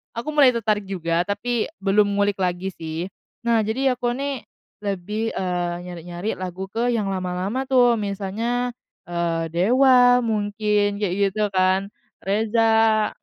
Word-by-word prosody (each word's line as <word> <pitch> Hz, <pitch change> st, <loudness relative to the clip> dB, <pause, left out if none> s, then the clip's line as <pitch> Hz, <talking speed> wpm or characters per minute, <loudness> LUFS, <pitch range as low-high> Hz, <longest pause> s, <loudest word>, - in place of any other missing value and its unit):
aku 235 Hz, +6 st, -4 dB
mulai 285 Hz, -4 st, +5 dB
tertarik 210 Hz, -3 st, 0 dB
juga, 170 Hz, -2 st, -1 dB
tapi 220 Hz, +3 st, -1 dB, 0.2 s
belum 200 Hz, +1 st, +4 dB
ngulik 200 Hz, 0 st, +1 dB
lagi 180 Hz, 0 st, -1 dB
sih. 160 Hz, -1 st, -5 dB, 0.4 s
Nah, 235 Hz, -1 st, +3 dB
jadi 255 Hz, +4 st, 0 dB
aku 240 Hz, 0 st, -1 dB
nih, 275 Hz, -2 st, -4 dB, 0.4 s
lebih, 205 Hz, +3 st, -2 dB
eee, 175 Hz, -2 st, -2 dB
nyari-nyari 175 Hz, +2 st, -6 dB
lagu 185 Hz, +1 st, -6 dB
ke, 235 Hz, +4 st, 0 dB
yang 210 Hz, -4 st, -1 dB
lama-lama 190 Hz, +6 st, -2 dB
tuh, 245 Hz, -3 st, +4 dB
misalnya, 215 Hz, +5 st, -2 dB, 0.4 s
eee, 170 Hz, -1 st, -1 dB
Dewa, 245 Hz, -, +5 dB
mungkin, 210 Hz, -1 st, 0 dB
kayak 195 Hz, -4 st, 0 dB, 0.2 s
gitu 210 Hz, 0 st, 0 dB
kan, 190 Hz, +1 st, +1 dB, 0.3 s
Reza, 220 Hz, +1 st, +2 dB
205 Hz, 130 wpm, -23 LUFS, 185-235 Hz, 0.4 s, mulai